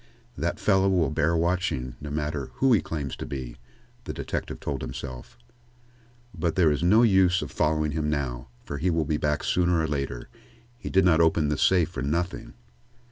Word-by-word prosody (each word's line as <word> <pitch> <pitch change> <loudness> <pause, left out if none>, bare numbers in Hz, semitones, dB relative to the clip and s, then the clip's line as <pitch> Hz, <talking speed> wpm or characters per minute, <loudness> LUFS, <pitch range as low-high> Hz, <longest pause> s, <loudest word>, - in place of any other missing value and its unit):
"That - - -2
fellow 95 -1 +3
will 90 -5 +2
bear 80 +2 +1
watching, 85 -8 -1
no 75 - -6
matter 75 -2 -3
who 135 -2 +3
he 105 - +4
claims 75 -4 -4
to - - -5
be," 65 -4 -6 0.5
the - - -4
detective - - -4
told - - -4
himself. 65 -1 -7 1.0
"But 85 -2 -1
there 85 -5 +4
is 75 +1 -1
no 105 +7 +5
use 95 -5 +4
of 70 - -7
following 75 0 +1
him 75 0 -1
now, 65 -5 -3 0.2
for 70 - -5
he 90 +5 +1
will 80 -2 +1
be 75 +1 0
back 75 -1 -1
sooner 90 -1 +2
or 80 - 0
later. 70 -5 -3 0.5
He - - -6
did 95 -1 +3
not 85 -2 +5
open 80 -2 +3
this 75 - -1
safe 90 -4 +3
for - - -6
nothing." 85 - -3
80 Hz, 190 wpm, -26 LUFS, 70-90 Hz, 1.0 s, no